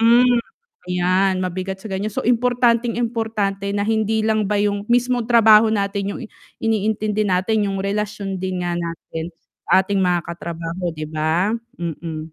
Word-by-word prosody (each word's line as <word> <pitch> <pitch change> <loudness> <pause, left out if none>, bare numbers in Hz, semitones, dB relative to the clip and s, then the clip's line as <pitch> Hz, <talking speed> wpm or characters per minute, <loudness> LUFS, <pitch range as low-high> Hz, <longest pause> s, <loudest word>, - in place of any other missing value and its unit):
hmm. 240 +1 +5 0.5
'Yan 185 +1 +2
mabigat 185 +1 -3
sa 220 - -8
ganiyan. 195 +2 -2
So, - - -3
importanteng 240 -1 +2
importante 220 -4 -1
na 205 - 0
hindi 220 0 +1
lang 215 -2 +1
ba 210 - +1
'yong, 205 +1 -1
mismong 245 -1 +1
trabaho 220 -2 +7
natin 200 -1 -1
'yong - - -8
i - - -10 0.4
iniintindi 215 -1 0
natin. 200 +3 +1
'Yong 195 - -2
relasyon 200 -2 -3
din 185 -1 -2
nga 175 - -1
natin 165 -1 -5 0.4
sa 190 0 +5
ating 200 0 0
mga 180 -1 +2
katrabaho, 170 +1 -5
'di 155 -1 -6
ba? 160 +6 +1 0.2
Mm. 160 -2 -5
200 Hz, 155 wpm, -21 LUFS, 180-220 Hz, 0.5 s, trabaho